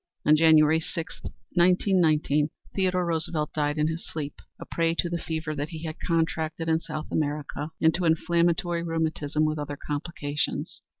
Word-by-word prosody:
On 150 - +7
January 160 0 +6
6, 160 0 -5 0.3
1919, 170 -5 +3 0.2
Theodore 185 -2 +1
Roosevelt 160 -2 -1
died 150 0 0
in 150 0 +2
his 160 +2 -3
sleep, 145 -2 -5 0.3
a - - -7
prey 165 0 0
to 175 - 0
the 170 - -1
fever 160 -1 -3
that 145 0 -3
he 160 -2 -7
had 155 -1 -5
contracted 165 -1 -1
in 160 0 +3
South 155 -2 -6
America 150 0 -2
and 160 0 +4
to 180 +2 -1
inflammatory 170 +1 +2
rheumatism 160 -2 0
with 155 0 -1
other 145 -1 -4
complications. 145 -1 -3
160 Hz, 160 wpm, -27 LUFS, 150-170 Hz, 0.3 s, On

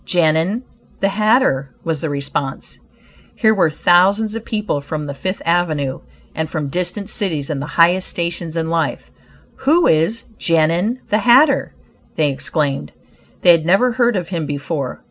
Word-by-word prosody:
"Genin, 175 +6 +1 0.4
the 195 - +2
hatter," 210 - +2
was 160 -3 -2
the 160 - -2
response. 140 -1 -4 0.6
Here 220 -2 +3
were 190 -6 +2
thousands 195 +7 +3
of 225 0 -5
people 210 -10 -2
from 150 +1 -5
the 140 - -5
Fifth 185 +8 -4
avenue, 155 -6 0 0.3
and 160 -1 -3
from 150 -4 -3
distant 180 +5 -3
cities 170 -10 -2
in 145 - -3
the 145 - -5
highest 175 +2 +4
stations 170 -1 -4
in 165 0 -2
life. 165 -2 -2 0.5
"Who 325 +5 +3
is 170 +9 +2 0.2
'Genin,' 170 +8 +1
the 210 - +2
hatter?" 265 +6 +4 0.4
they 150 -2 +1
exclaimed. 140 - -3 0.5
They 175 - +8
had 165 -2 +3
never 195 +9 +3
heard 240 -1 +1
of 180 -3 -3
him 165 -5 -3
before. 140 -1 -4
170 Hz, 155 wpm, -18 LUFS, 155-210 Hz, 0.6 s, They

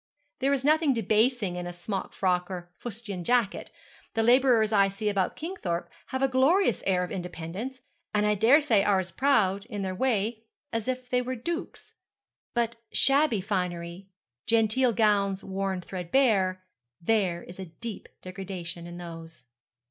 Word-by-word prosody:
There 275 +1 +2
is 275 -1 0
nothing 305 -2 +4
debasing 220 -2 +1
in 175 0 -4
a - - -4
smock 185 +3 -4
frock 180 -1 0
or 185 - -3
a 175 0 -10
fustian 215 -5 -6
jacket. 235 0 +1 0.5
The 225 - +2
labourers 240 -2 +5
I 200 -1 +5
see 200 +2 -2
about 195 -2 0
Kingthorpe 255 - -4 0.2
have 260 +1 -2
a - - +5
glorious 265 - +3
air 180 -2 +2
of 180 - -5
independence, 180 +8 -5 0.3
and 210 -1 +2
I 210 - +3
daresay 235 +1 +5
are 200 0 +3
as 185 -1 -2
proud, 200 -5 +2
in 205 -5 -4
their 190 -1 -2
way, 220 0 0 0.3
as 225 0 -2
if 255 -1 -2
they 250 0 +3
were 255 +1 -3
dukes. 335 +9 -5 0.6
But 235 -1 0
shabby 275 -6 +3
finery 180 -2 -3 0.4
genteel 230 +3 +3
gowns 200 -3 +2
worn 190 -1 -2
threadbare: 185 0 +1 0.4
there 185 -3 +1
is 175 +2 -11
a 190 - -4
deep 200 +6 -8
degradation 180 -2 -6
in 175 0 -8
those.' 165 -5 -10
205 Hz, 155 wpm, -28 LUFS, 185-245 Hz, 0.6 s, labourers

